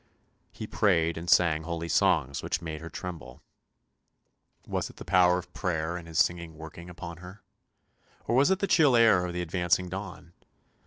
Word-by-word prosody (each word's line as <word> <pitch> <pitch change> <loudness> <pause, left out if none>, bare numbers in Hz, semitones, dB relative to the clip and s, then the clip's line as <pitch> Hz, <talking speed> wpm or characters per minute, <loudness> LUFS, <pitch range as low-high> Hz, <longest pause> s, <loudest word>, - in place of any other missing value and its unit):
He - - -7
prayed 85 -5 +1
and 85 +2 -6
sang 80 -3 +4
holy 85 0 -4
songs 80 -8 +1
which - - -2
made 80 -2 -6
her 85 - -8
tremble. 90 -2 -8 1.2
Was - - -3
it - - -15
the - - -10
power 90 -1 +4
of 90 - -8
prayer 85 -2 -2
and 85 -2 -8
his 80 -1 -6
singing 85 -1 0
working 80 +2 -10
upon 85 -1 -8
her, 90 +3 -12 0.8
or 120 - 0
was 140 +6 +4
it 190 - +3
the 200 - -1
chill 150 -9 +4
air 110 -6 +5
of 90 - -5
the 90 0 -2
advancing 90 +1 0
dawn? 90 -2 -8
85 Hz, 175 wpm, -28 LUFS, 85-90 Hz, 1.2 s, air